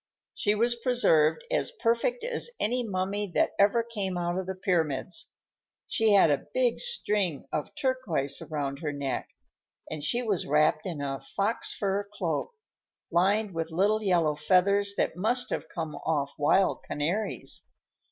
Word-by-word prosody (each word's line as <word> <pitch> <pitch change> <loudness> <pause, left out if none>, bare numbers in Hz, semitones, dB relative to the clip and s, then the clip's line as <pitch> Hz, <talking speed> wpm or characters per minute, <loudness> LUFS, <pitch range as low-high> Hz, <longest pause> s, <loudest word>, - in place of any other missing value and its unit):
She 210 0 +1
was 235 +3 +3
preserved 235 - +2
as - - 0
perfect 430 - 0
as 480 0 0
any 245 +4 +1
mummy 200 -1 -2
that - - +3
ever 205 +4 +4
came 205 -6 -3
out 175 0 -1
of 185 0 -3
the 190 - -3
pyramids. 175 -3 -1 0.5
She 225 -2 +2
had 190 -6 +6
a 145 - -1
big 250 -2 +2
string 210 - +1
of 150 - -3
turquoises 200 - -1
around 140 -3 -3
her 155 -3 -2
neck, 140 -2 -3 0.6
and 155 -2 -5
she 240 +11 +1
was 205 -7 -1
wrapped 155 +3 +2
in 165 -5 -4
a 135 -1 -3
fox 205 +3 -2
fur 200 0 -2
cloak, 165 -7 -2 0.6
lined 200 +4 +2
with 165 0 -3
little 200 +6 +2
yellow 175 -6 +2
feathers 200 +6 +2
that - - 0
must 240 +6 0
have - - -3
come 160 -3 -4
off 145 -2 -2
wild 185 +6 +2
canaries. 175 +9 -2
190 Hz, 150 wpm, -28 LUFS, 155-220 Hz, 0.6 s, had